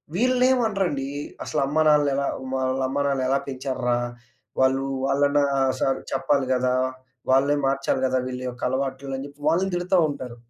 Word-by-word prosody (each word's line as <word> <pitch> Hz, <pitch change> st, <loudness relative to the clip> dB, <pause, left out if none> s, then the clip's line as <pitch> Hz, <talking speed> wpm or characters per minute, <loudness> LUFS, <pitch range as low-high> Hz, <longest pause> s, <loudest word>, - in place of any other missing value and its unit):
వీళ్ళనేం 255 Hz, +3 st, +3 dB
అనరండి. 175 Hz, -10 st, -1 dB, 0.3 s
అసల -, -, -2 dB
అమ్మానాన్నలెలా 145 Hz, -2 st, +3 dB, 0.3 s
వాళ్ళ 130 Hz, 0 st, 0 dB
అమ్మానాన్నలు 140 Hz, -1 st, 0 dB
ఎలా 135 Hz, -, +3 dB
పెంచార్రా! 130 Hz, -2 st, -1 dB, 0.6 s
వాళ్ళు 135 Hz, +1 st, +2 dB, 0.2 s
వాళ్ళన 145 Hz, +1 st, +2 dB, 0.4 s
సర్ 135 Hz, -, +1 dB
చెప్పాలి 135 Hz, 0 st, +1 dB
గదా! 125 Hz, 0 st, +1 dB, 0.6 s
వాళ్ళే 140 Hz, +2 st, +4 dB
మార్చాలి 135 Hz, -1 st, 0 dB
గదా! 130 Hz, 0 st, +1 dB
వీళ్ళ 125 Hz, 0 st, -5 dB
యొక్క 120 Hz, 0 st, -11 dB
అలవాట్లని 135 Hz, +1 st, -3 dB, 0.2 s
వాళ్ళని 185 Hz, +4 st, +1 dB
తిడతా 180 Hz, +2 st, +1 dB
ఉంటారు. 130 Hz, -4 st, -6 dB
135 Hz, 125 wpm, -24 LUFS, 130-145 Hz, 0.6 s, వాళ్ళే